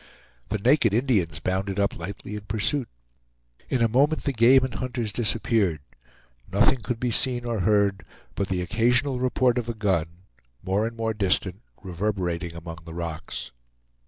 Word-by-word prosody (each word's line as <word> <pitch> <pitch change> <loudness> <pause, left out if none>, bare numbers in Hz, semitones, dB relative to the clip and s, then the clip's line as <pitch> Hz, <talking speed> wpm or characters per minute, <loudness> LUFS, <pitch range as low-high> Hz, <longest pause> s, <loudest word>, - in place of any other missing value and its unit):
The 110 - 0
naked 115 -1 +3
Indians 105 - +1
bounded 95 +3 -2
up 100 - +1
lightly 100 +4 -7
in 105 - -5
pursuit. 110 +5 -1 0.8
In 125 -3 +2
a - - +5
moment 140 +7 +2
the 140 - -1
game 125 +3 +6
and 130 -2 -2
hunters 120 -5 -3
disappeared. 110 - +1 0.7
Nothing 130 - +3
could 115 +1 -3
be 125 0 0
seen 120 0 0
or 115 -2 -1
heard 100 0 +2 0.3
but 100 - -1
the 90 -1 -1
occasional 120 +6 +2
report 125 -1 +2
of 120 -1 -5
a 120 - -3
gun, 90 -4 -1 0.4
more 100 +4 +1
and 115 0 -8
more 110 0 -1
distant, 95 -1 0 0.2
reverberating 90 -3 -2
among 85 0 -8
the 80 0 -10
rocks. 80 -7 -5
105 Hz, 160 wpm, -25 LUFS, 95-120 Hz, 0.8 s, game